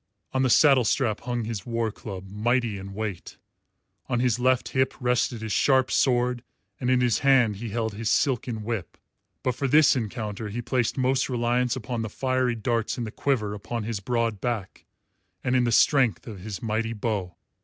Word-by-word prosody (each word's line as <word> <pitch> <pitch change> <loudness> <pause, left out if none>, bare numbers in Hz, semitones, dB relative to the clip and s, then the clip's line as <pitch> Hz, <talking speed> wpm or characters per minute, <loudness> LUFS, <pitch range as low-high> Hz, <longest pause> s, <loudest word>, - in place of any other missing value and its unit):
On 130 - +1
the 130 - +2
saddle 135 0 +6
strap 110 -1 +1
hung 120 -1 -3
his 110 -4 -4
war 115 -1 -1
club, 95 -3 -8
mighty 110 +1 0
in 100 0 -9
weight; 105 -5 -5 0.7
on 120 - +1
his 125 -2 +1
left 130 0 +2
hip 130 0 0
rested 125 -2 0
his 110 - -4
sharp 130 +3 +3
sword 125 -1 +2 0.4
and 125 - -1
in 130 -1 +3
his 120 -3 +2
hand 130 -7 +4
he 115 +2 -5
held 110 0 -2
his 110 +1 -3
silken 120 -5 0
whip; 110 -6 -4 0.5
but 130 - +1
for 135 +3 -2
this 150 +2 +5
encounter 110 -3 -4
he 110 +4 -4
placed 120 0 -1
most 130 +1 +1
reliance 120 0 +1
upon 120 -1 -4
the 110 - -3
fiery 130 +1 0
darts 115 +1 -1
in 120 - -2
the 110 - -5
quiver 110 -7 -1
upon 110 +3 -4
his 110 -1 -3
broad 115 0 -1
back 115 -6 -4 0.6
and 125 - +1
in 125 -1 +3
the 120 - +1
strength 130 -1 +3
of 110 -5 -8
his 100 +2 -7
mighty 115 +1 -1
bow. 105 -6 -3
120 Hz, 185 wpm, -26 LUFS, 110-125 Hz, 0.7 s, saddle